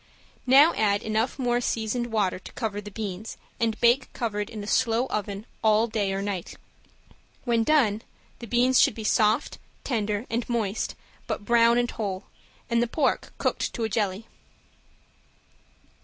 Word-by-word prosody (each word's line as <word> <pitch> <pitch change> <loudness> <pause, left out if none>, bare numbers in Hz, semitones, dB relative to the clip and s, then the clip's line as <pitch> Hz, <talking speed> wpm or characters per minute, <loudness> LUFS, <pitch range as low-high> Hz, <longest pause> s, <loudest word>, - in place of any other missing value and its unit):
Now 280 +6 +7
add 205 -1 +1
enough 220 +3 -1
more 245 -2 +1
seasoned 235 +1 -1
hot - - -12
water 200 -5 0
to - - -12
cover 210 -4 -3
the 210 - -9
beans, 210 0 -6 0.2
and 225 -1 0
bake 245 +2 +3
covered 210 -2 -3
in 215 -3 -7
a - - -6
slow 230 +2 +2
oven 205 0 -3 0.2
all 220 0 +4
day 210 -4 -1
or 195 +1 -2
night. 195 -4 -4 0.9
When 235 -2 +2
done 225 -7 +3 0.4
the 235 - -8
beans 250 +3 +3
should - - +3
be 220 - -6
soft, 215 +1 +2 0.2
tender 215 -3 -1
and 235 +1 -3
moist 225 -3 -1 0.3
but 205 - -4
brown 235 +1 +4
and 240 0 +1
whole, 195 -3 -4 0.4
and 235 0 +1
the 240 - +1
pork 270 +3 0
cooked - - -1
to 235 - -2
a 220 - 0
jelly. 205 -1 -1
225 Hz, 160 wpm, -26 LUFS, 205-240 Hz, 0.9 s, Now